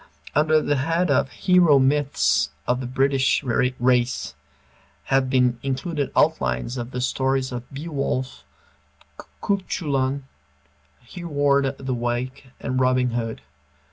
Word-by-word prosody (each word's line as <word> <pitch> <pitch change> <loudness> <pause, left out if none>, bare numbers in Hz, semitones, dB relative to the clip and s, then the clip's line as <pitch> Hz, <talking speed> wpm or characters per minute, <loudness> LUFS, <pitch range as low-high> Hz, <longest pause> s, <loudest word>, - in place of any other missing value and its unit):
Under 155 +1 +3
the 145 - +1
head 165 +4 +1
of 135 - +2
"Hero 180 -4 +4
Myths 135 - +2 0.2
of 125 0 0
the 130 - -4
British 135 +2 +1
Race" 125 0 +1 0.7
have 135 -1 +1
been 125 -2 +2
included 140 +2 -2
outlines 65 - +1
of 120 -1 -5
the 125 -1 -4
stories 130 +1 0
of 125 -1 -7
Beowulf, 140 - -3 1.0
Cuchulain, 140 -9 -1 0.8
Hereward 140 -2 0
the 130 -1 -3
Wake, 120 +2 -3
and 130 -1 -2
Robin 130 -1 +2
Hood. 115 - -4
130 Hz, 110 wpm, -23 LUFS, 125-145 Hz, 1.0 s, Hero